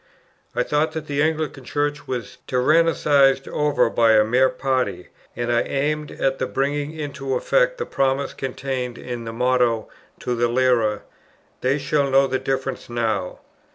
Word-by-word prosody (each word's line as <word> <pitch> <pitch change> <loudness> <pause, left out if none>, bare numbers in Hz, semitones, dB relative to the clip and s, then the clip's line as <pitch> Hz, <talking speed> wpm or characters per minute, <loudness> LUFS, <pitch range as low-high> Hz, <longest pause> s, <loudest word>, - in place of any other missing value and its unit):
I 125 - +2
thought 150 +4 0
that 160 -1 -4
the 145 -1 -1
Anglican 155 -3 -1
Church 145 +3 -2
was 125 -5 -5
tyrannized 140 -1 +3
over 150 -1 +1
by 115 -1 +3
a 110 -1 +6
mere 125 +4 +3
party, 130 -8 -2 0.3
and 120 0 -2
I 120 - +3
aimed 150 +2 -1
at 135 0 -1 0.2
bringing 145 +2 0
into 140 -4 -4
effect - - +2
the 470 - -3
promise 135 +1 0
contained 130 -2 -4
in 120 -2 -6
the 115 - -4
motto 125 -1 +1 0.3
to 125 - -2
the 120 0 +1
Lyra, 120 -4 +2 0.6
"They 130 +3 +2
shall 140 0 0
know 135 +1 +5
the 130 -1 -1
difference 135 -1 -3
now." 110 -6 -2
135 Hz, 155 wpm, -22 LUFS, 125-145 Hz, 0.6 s, a